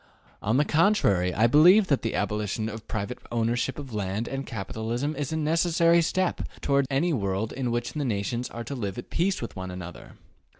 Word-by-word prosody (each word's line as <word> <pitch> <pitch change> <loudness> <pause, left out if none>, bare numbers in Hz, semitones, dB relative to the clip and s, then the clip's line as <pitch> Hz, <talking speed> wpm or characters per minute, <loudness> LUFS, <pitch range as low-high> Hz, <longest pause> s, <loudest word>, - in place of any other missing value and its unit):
On 110 +4 +1
the 150 - +3
contrary, 150 - +3
I 110 +5 +2
believe 175 - +7
that 140 -7 +1
the 115 - -2
abolition 105 +1 -1
of 110 -1 -8
private 110 +4 -4
ownership 120 +2 0
of 135 -5 -8
land 105 +2 -2
and 135 0 -4
capital 110 0 -5
is 120 +3 -1 0.3
a 160 - -1
necessary 165 +2 +3
step 185 +2 0 0.2
toward 140 -1 +1
any 160 +5 +1
world 100 -2 -1
in 130 -2 -2
which 120 0 -2
the 150 - -2
nations 120 +1 -2
are 115 - -6
to 120 - -6
live 100 -7 -4
at 120 - -8
peace 185 -4 0
with 115 - -6
one 95 -1 -5
another. 90 -1 -9
120 Hz, 195 wpm, -26 LUFS, 105-150 Hz, 0.3 s, believe